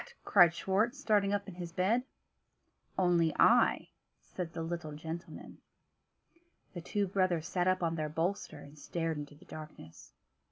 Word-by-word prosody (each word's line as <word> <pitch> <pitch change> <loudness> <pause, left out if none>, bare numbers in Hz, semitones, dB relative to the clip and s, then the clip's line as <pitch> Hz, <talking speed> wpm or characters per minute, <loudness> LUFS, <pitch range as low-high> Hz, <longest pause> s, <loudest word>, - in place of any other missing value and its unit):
cried 175 -5 +6
Schwartz, 205 +9 0
starting 210 -7 +2
up 205 0 -1
in 195 - -7
his 175 -1 -7
bed. 195 +8 +2 1.0
"Only 175 -4 +3
I," - - +4 0.3
said 175 -3 -6
the 165 -1 -4
little 165 -2 -4
gentleman. 160 +3 -8 1.1
The 175 - -6
two 205 +5 -1
brothers 185 -3 0
sat 180 0 0
up 185 -1 +2
on 165 -1 +1
their 155 -2 -2
bolster, 170 +6 -2
and 145 +1 -13
stared 165 +1 -2
into 145 0 -8
the 165 - -18
darkness. 155 - -11
175 Hz, 150 wpm, -32 LUFS, 160-190 Hz, 1.1 s, cried